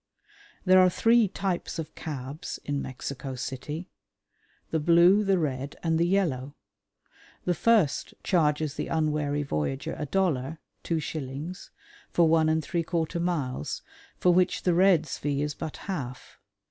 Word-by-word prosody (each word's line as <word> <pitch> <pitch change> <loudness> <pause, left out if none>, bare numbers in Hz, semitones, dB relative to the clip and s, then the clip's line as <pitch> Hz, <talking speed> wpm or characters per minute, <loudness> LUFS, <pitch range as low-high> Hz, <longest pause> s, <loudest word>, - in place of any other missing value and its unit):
There 185 0 +7
are 185 0 +6
three 230 +4 +4
types 190 -1 -3
of 160 -1 -5
cabs 140 -1 -6
in 145 -1 -1
Mexico 130 +1 -5
City; 140 +7 -5 0.8
the 160 - +1
blue, 175 +6 +5
the 195 -2 +3
red, 140 -4 -2
and 165 -1 +1
the 170 - +3
yellow. 145 -8 0 0.9
The 180 - +2
first 210 -7 +2
charges 155 -4 +2
the - - -4
unwary 150 -2 0
voyager 135 - -2
a 150 - -3
dollar 160 -5 0 0.2
(two 165 -1 -1
shillings) 155 +3 -5 0.4
for 170 -1 +4
one 160 -1 +4
and 160 0 +1
three 170 +3 -1
quarter 165 0 -2
miles, 150 - -2 0.3
for 180 - +4
which 180 +1 +2
the 180 - +3
red's 170 -4 +3
fee 145 0 -1
is 150 0 -2
but 160 0 -6
half. 135 -10 -6
160 Hz, 145 wpm, -27 LUFS, 140-180 Hz, 0.9 s, There